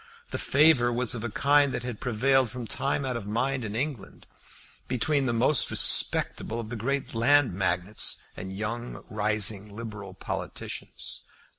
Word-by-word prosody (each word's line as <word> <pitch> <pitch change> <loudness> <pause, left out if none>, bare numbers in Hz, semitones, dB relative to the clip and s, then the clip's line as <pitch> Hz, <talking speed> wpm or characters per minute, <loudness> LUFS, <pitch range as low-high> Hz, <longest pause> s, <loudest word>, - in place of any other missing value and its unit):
The - - -3
favour 140 -5 +4
was 120 0 0
of 115 -2 -4
a 120 - -3
kind 145 +4 +3
that 125 - -4
had 120 -4 -6
prevailed 130 +2 +1
from 125 -2 -7
time 140 +4 -1
out 130 -1 -2
of 110 -4 -6
mind 125 +4 -1
in 105 -1 -5
England, 125 -4 -5 0.6
between 135 +2 +1
the - - +1
most 120 +5 +4
respectable 115 +1 +2
of 110 -2 -6
the 120 - -5
great 135 +5 -3
land 130 +1 +3
magnates, 90 +2 +1
and 95 +1 -7
young 110 +5 -5
rising 105 -1 +2
liberal 105 -4 -8
politicians. - - -6
120 Hz, 155 wpm, -27 LUFS, 105-135 Hz, 0.6 s, favour